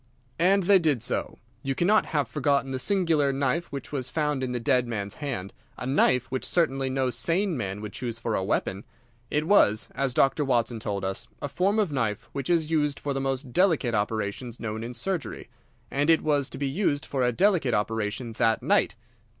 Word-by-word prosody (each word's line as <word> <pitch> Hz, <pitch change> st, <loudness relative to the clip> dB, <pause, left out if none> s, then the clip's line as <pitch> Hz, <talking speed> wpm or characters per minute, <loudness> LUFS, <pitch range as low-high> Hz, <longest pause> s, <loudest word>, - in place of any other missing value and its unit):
"And 190 Hz, +3 st, +4 dB
they 195 Hz, +1 st, +6 dB
did 150 Hz, -9 st, +1 dB
so. -, -, -1 dB, 0.2 s
You 135 Hz, +1 st, -2 dB
cannot 205 Hz, +8 st, +3 dB
have 145 Hz, -3 st, 0 dB
forgotten 140 Hz, -2 st, 0 dB
the 130 Hz, -, -2 dB
singular 165 Hz, -5 st, +2 dB
knife 140 Hz, +5 st, 0 dB
which 140 Hz, -2 st, -6 dB
was 130 Hz, -4 st, -2 dB
found 150 Hz, -3 st, -1 dB
in 130 Hz, -1 st, -2 dB
the 125 Hz, -, -2 dB
dead 125 Hz, 0 st, +2 dB
man's 100 Hz, -4 st, -4 dB
hand, 115 Hz, -10 st, -4 dB, 0.2 s
a 125 Hz, -, -5 dB
knife 130 Hz, -2 st, +3 dB
which 130 Hz, -, -2 dB
certainly 135 Hz, -6 st, +1 dB
no 130 Hz, -1 st, 0 dB
sane 170 Hz, -, +1 dB
man 100 Hz, -4 st, -4 dB
would 105 Hz, -2 st, -7 dB
choose 120 Hz, -2 st, -3 dB
for 115 Hz, -1 st, -3 dB
a 95 Hz, -, 0 dB
weapon. 95 Hz, 0 st, -1 dB, 0.5 s
It 150 Hz, +1 st, 0 dB
was, 110 Hz, -, +4 dB
as 135 Hz, -2 st, -1 dB
Dr. 140 Hz, +2 st, +3 dB
Watson 120 Hz, -3 st, 0 dB
told 100 Hz, -3 st, -3 dB
us, 95 Hz, 0 st, -3 dB
a -, -, -3 dB
form 190 Hz, +8 st, 0 dB
of 205 Hz, -7 st, +1 dB
knife 115 Hz, -7 st, -2 dB
which 140 Hz, -2 st, -4 dB
is 165 Hz, -2 st, +2 dB
used 150 Hz, -3 st, +1 dB
for 145 Hz, -, -2 dB
the 135 Hz, -, -2 dB
most 135 Hz, -1 st, -3 dB
delicate 165 Hz, -10 st, +2 dB
operations 110 Hz, +3 st, -2 dB
known 110 Hz, 0 st, -4 dB
in 120 Hz, +1 st, -6 dB
surgery. 180 Hz, -8 st, -3 dB, 0.4 s
And 145 Hz, +3 st, +1 dB
it 165 Hz, -1 st, +4 dB
was 145 Hz, -3 st, +1 dB
to -, -, -7 dB
be 140 Hz, 0 st, -1 dB
used 145 Hz, -1 st, 0 dB
for 135 Hz, -, -2 dB
a 125 Hz, 0 st, +3 dB
delicate 165 Hz, -, +2 dB
operation 110 Hz, +2 st, -2 dB
that 110 Hz, 0 st, +1 dB
night. -, -, +2 dB
135 Hz, 200 wpm, -26 LUFS, 115-150 Hz, 0.5 s, they